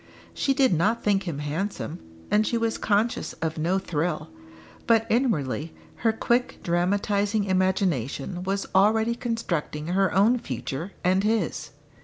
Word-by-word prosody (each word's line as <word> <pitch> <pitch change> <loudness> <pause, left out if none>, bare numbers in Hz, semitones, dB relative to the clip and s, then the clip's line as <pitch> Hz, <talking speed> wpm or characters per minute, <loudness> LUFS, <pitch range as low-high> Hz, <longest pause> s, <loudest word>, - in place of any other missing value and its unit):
She 275 - +1
did 265 -6 +4
not 205 +8 +1
think 200 -2 +1
him 160 -5 -3
handsome, 160 +3 -3 0.3
and 215 +1 +3
she 235 - +1
was 230 -1 -1
conscious 215 +3 0
of 160 -1 -3
no 175 +5 +1
thrill. 165 - -2 0.6
But 225 -1 +4
inwardly 165 - 0 0.2
her 225 - +2
quick 240 +2 0
dramatising 200 +4 +1
imagination 185 - 0
was 195 +2 -2
already 220 +4 +4
constructing 175 -10 -3
her 195 +2 +2
own 220 +6 +4
future 140 - -5
and 185 +2 +3
his. 220 +1 0
195 Hz, 135 wpm, -25 LUFS, 170-220 Hz, 0.6 s, did